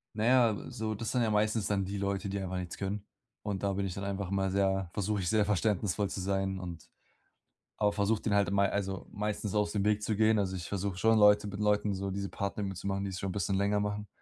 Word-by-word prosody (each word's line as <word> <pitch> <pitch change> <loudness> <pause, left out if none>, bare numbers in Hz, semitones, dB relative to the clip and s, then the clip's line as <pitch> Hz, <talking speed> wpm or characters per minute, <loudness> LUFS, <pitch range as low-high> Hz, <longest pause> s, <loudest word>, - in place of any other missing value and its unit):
Naja, 120 +1 +4
äh, 100 - -6
so, 110 -3 -2
das 110 +2 -3
sind 125 - +1
ja 115 - +2
meistens 105 0 +1
dann 100 -2 0
die 100 +2 -4
Leute, 100 0 -1
die 100 - -2
einfach 95 -1 -3
nichts 90 -2 -5
können. 100 +1 -3 0.4
Und 100 -2 -3
da 100 -1 +1
bin 100 0 -1
ich 90 - -3
dann 100 - -5
einfach 100 -1 -3
mal 95 -1 0
sehr 95 -1 +1
versuche 100 0 -1
ich, 90 - -1
sehr 110 -2 +3
verständnisvoll 105 -1 +1
zu - - -4
sein 95 0 -1
und 85 -3 -8 0.9
aber 105 -1 +2
versuche 105 +1 +1
den 105 - 0
halt 100 -1 +3
e - - -1
mei 100 0 +3
also, 95 -2 -2
meistens 105 0 -2
aus 105 0 +1
dem 100 -2 0
Weg 105 0 +2
zu 105 -1 -1
gehen. 110 0 +4
Also 95 -2 0
ich 85 -1 -5
versuche 100 -1 -2
schon 110 +3 +4
Leute 105 0 +6
mit 100 0 -5
Leuten 105 0 +2
so 95 +1 -3
diese 100 0 -3
Partnerübungen 100 0 -3
zu 90 - -7
machen, 100 0 -1
die 95 - -2
es 95 - -5
schon 95 - -2
'n - - -4
bisschen 95 0 -1
länger 100 +1 +2
machen. 105 0 -3
100 Hz, 260 wpm, -31 LUFS, 95-105 Hz, 0.9 s, Leute